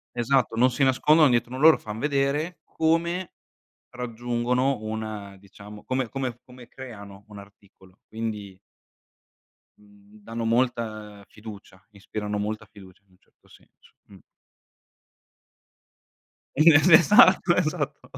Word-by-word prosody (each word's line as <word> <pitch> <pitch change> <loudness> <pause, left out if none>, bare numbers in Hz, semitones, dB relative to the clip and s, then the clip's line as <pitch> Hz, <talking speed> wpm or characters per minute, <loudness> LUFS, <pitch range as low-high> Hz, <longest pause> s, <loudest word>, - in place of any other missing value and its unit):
Esatto, 125 0 0
non 125 +3 +3
si 135 - -1
nascondono 150 +3 +4
dietro 120 -1 0
no 130 - -6
loro 160 +2 +6
fan 105 0 -8
vedere 145 +4 -1
come, 170 +3 -2 0.6
raggiungono 125 +2 -2
un 110 -2 -6
diciamo 100 +2 -14
come 130 -1 -2
come 130 -3 -5
come 125 -1 -15
creano 100 -7 -12
un 105 -1 -12
articolo, 100 -2 -19
quindi 105 -4 -7 1.2
Mhmm, 100 0 -22
danno 115 +2 -5
molta 115 -3 -2
fiducia, 105 -3 -13
ispirano 105 +1 -6
molta 105 +1 -4
fiducia 95 -1 -18
in 95 - -35
un 90 - -27
certo - - -33
senso, - - -23
mh. 100 -2 -17 2.4
Es 155 +2 +5
esatto. 170 +5 +6
Esatto. - - -3
Mh, - - -10
115 Hz, 120 wpm, -24 LUFS, 105-130 Hz, 2.4 s, loro